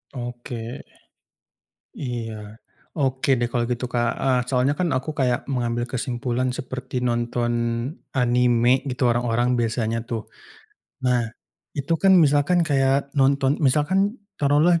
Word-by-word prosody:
Oke. 120 Hz, -1 st, -6 dB, 1.1 s
Iya. 115 Hz, -4 st, -6 dB, 0.4 s
Oke 130 Hz, 0 st, 0 dB
deh 120 Hz, -, +1 dB
kalau 120 Hz, 0 st, 0 dB
gitu, 125 Hz, +1 st, -2 dB
Kak, 120 Hz, -1 st, +1 dB
heeh, 130 Hz, -1 st, +2 dB
soalnya 130 Hz, +2 st, +1 dB
kan 180 Hz, -1 st, 0 dB
aku 135 Hz, +4 st, -2 dB
kayak 125 Hz, -2 st, 0 dB
mengambil 120 Hz, -2 st, -1 dB
kesimpulan 125 Hz, 0 st, -2 dB
seperti 130 Hz, 0 st, -5 dB
nonton 120 Hz, 0 st, 0 dB, 0.6 s
anime 125 Hz, 0 st, +3 dB
gitu 125 Hz, -2 st, 0 dB
orang-orang 120 Hz, +1 st, +1 dB
biasanya 115 Hz, -1 st, -1 dB
tuh. 115 Hz, -2 st, -5 dB, 0.8 s
Nah 125 Hz, -2 st, +2 dB, 0.5 s
itu 140 Hz, +3 st, -1 dB
kan 190 Hz, -1 st, +6 dB
misalkan 160 Hz, +2 st, +4 dB
kayak 140 Hz, -2 st, +1 dB
nonton 140 Hz, 0 st, +2 dB
misalkan 175 Hz, -, +2 dB, 0.2 s
taruhlah 150 Hz, +4 st, +4 dB
125 Hz, 120 wpm, -23 LUFS, 120-140 Hz, 1.1 s, kan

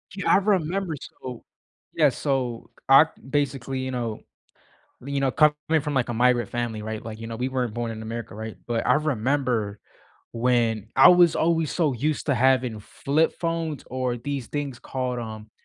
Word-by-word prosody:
Yeah, 195 Hz, -, 0 dB
I -, -, +7 dB
remember 190 Hz, -3 st, 0 dB, 0.3 s
so 125 Hz, -2 st, -7 dB, 0.5 s
Yeah, 155 Hz, -3 st, +4 dB
so 130 Hz, -3 st, -2 dB, 0.2 s
I 135 Hz, +4 st, +9 dB, 0.2 s
basically, 135 Hz, -2 st, -1 dB
you 130 Hz, -, -3 dB
know 120 Hz, -4 st, -3 dB, 0.9 s
you 140 Hz, 0 st, -1 dB
know, 135 Hz, -, +2 dB
coming 150 Hz, +2 st, +2 dB
from, 150 Hz, 0 st, -3 dB
like, 130 Hz, -3 st, +1 dB
a 120 Hz, -, -2 dB
migrant 120 Hz, -1 st, +3 dB
family, 120 Hz, -2 st, -3 dB
right, 110 Hz, 0 st, -5 dB
like, 110 Hz, -1 st, -7 dB
you 115 Hz, -, -6 dB
know, 115 Hz, 0 st, -5 dB
we 125 Hz, +2 st, -1 dB
weren't 125 Hz, -4 st, -2 dB
born 120 Hz, -1 st, -2 dB
in 110 Hz, -1 st, -6 dB
America, 115 Hz, -1 st, -6 dB
right? 110 Hz, 0 st, -7 dB
But 115 Hz, -1 st, -1 dB
I -, -, +5 dB
remember 125 Hz, -7 st, 0 dB, 0.5 s
when 115 Hz, -3 st, +1 dB
I 135 Hz, -, +9 dB
was 175 Hz, -2 st, +6 dB
always 165 Hz, -2 st, +1 dB
so 160 Hz, -5 st, +1 dB
used 145 Hz, +5 st, -2 dB
to 140 Hz, -, +2 dB
having 125 Hz, -3 st, +2 dB
flip 145 Hz, +9 st, 0 dB
phones 165 Hz, -4 st, -2 dB
or 130 Hz, -1 st, -2 dB
these 135 Hz, 0 st, -4 dB
things 140 Hz, -3 st, -4 dB
called, 125 Hz, -1 st, -3 dB
um, 110 Hz, -2 st, -7 dB
130 Hz, 175 wpm, -25 LUFS, 115-145 Hz, 0.9 s, I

